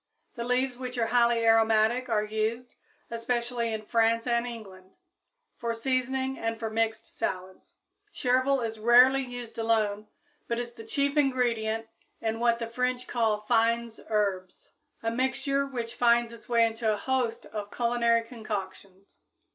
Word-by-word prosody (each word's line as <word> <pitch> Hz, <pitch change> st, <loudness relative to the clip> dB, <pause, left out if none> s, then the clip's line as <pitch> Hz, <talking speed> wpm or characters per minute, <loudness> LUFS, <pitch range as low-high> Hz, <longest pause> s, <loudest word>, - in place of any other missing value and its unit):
The 235 Hz, -, -5 dB
leaves, 250 Hz, +1 st, 0 dB
which 250 Hz, -1 st, -5 dB
are 230 Hz, -, +2 dB
highly 235 Hz, 0 st, +3 dB
aromatic, 225 Hz, +2 st, +3 dB
are 215 Hz, -2 st, +2 dB
used, 220 Hz, +3 st, -2 dB, 0.4 s
especially 235 Hz, 0 st, -1 dB
in 220 Hz, -1 st, -4 dB
France 230 Hz, +1 st, +2 dB
and 235 Hz, 0 st, +1 dB
England, 195 Hz, -5 st, -10 dB, 0.6 s
for 230 Hz, -1 st, -2 dB
seasoning 260 Hz, +2 st, -1 dB
and 225 Hz, 0 st, -2 dB
for 225 Hz, -1 st, -3 dB
mixed 225 Hz, 0 st, -2 dB
salads. 185 Hz, 0 st, -4 dB, 0.4 s
Chervil 260 Hz, -1 st, +1 dB
is 225 Hz, -1 st, -4 dB
rarely 250 Hz, +4 st, +6 dB
used 245 Hz, -3 st, -7 dB
alone, 215 Hz, -2 st, 0 dB, 0.4 s
but 235 Hz, -, -1 dB
is 240 Hz, 0 st, -4 dB
the 225 Hz, -2 st, -11 dB
chief 280 Hz, +5 st, 0 dB
ingredient 235 Hz, -5 st, +1 dB, 0.3 s
in 225 Hz, 0 st, -2 dB
what 235 Hz, 0 st, +3 dB
the 235 Hz, -, -3 dB
French 250 Hz, +2 st, -2 dB
call 220 Hz, -3 st, +1 dB
fines 230 Hz, +1 st, +1 dB
herbes, 195 Hz, -4 st, -2 dB, 0.3 s
a 225 Hz, -, 0 dB
mixture 270 Hz, +3 st, 0 dB
which 240 Hz, -3 st, -5 dB
finds 235 Hz, -1 st, +3 dB
its 230 Hz, 0 st, -14 dB
way 230 Hz, -1 st, +4 dB
into 225 Hz, 0 st, 0 dB
a 210 Hz, -, 0 dB
host 255 Hz, 0 st, -1 dB
of 205 Hz, -1 st, -6 dB
culinary 235 Hz, 0 st, +2 dB
concoctions. 200 Hz, -4 st, -7 dB
230 Hz, 145 wpm, -28 LUFS, 220-245 Hz, 0.6 s, rarely